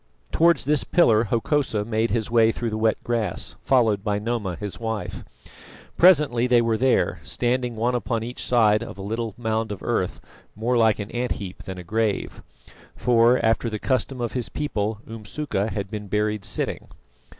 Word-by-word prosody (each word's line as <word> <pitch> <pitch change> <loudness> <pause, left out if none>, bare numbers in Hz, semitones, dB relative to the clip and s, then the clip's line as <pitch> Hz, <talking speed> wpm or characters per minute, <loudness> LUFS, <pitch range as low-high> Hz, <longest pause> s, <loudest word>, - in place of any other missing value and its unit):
Towards 165 -5 +3
this 150 +1 +2
pillar 115 -10 +4
Hokosa 115 -1 0
made 110 +1 0
his 115 -1 -1
way 115 -1 +5
through 115 0 -3
the 110 - -2
wet 110 0 +2
grass, 115 -3 -1
followed 110 -6 +2
by 105 -1 0
Noma 105 -4 -2
his 105 0 -6
wife. 110 -2 -4 0.7
Presently 150 -9 +5
they 125 -1 +5
were 115 -1 +1
there, 130 +3 +1
standing 125 0 -1
one 120 +3 0
upon 115 -2 -1
each 120 +2 -6
side 110 -3 +3
of 115 - -7
a - - -7
little 115 +1 -3
mound 110 -2 -1
of 100 - -7
earth - - -1 0.4
more 115 +4 0
like 110 -2 +4
an 105 0 -6
ant 120 +1 -1
heap 95 -3 -8
than 95 -1 -6
a 90 - -7
grave; 110 +3 -2 0.5
for, 120 0 +4
after 115 +1 +2
the 110 - -3
custom 130 +2 -1
of 120 -2 -2
his 125 -3 -2
people, 110 -7 -2
Umsuka 110 0 -3
had 100 -3 -4
been 105 -1 -5
buried 105 0 -1
sitting. - - -2
115 Hz, 175 wpm, -24 LUFS, 105-120 Hz, 0.7 s, way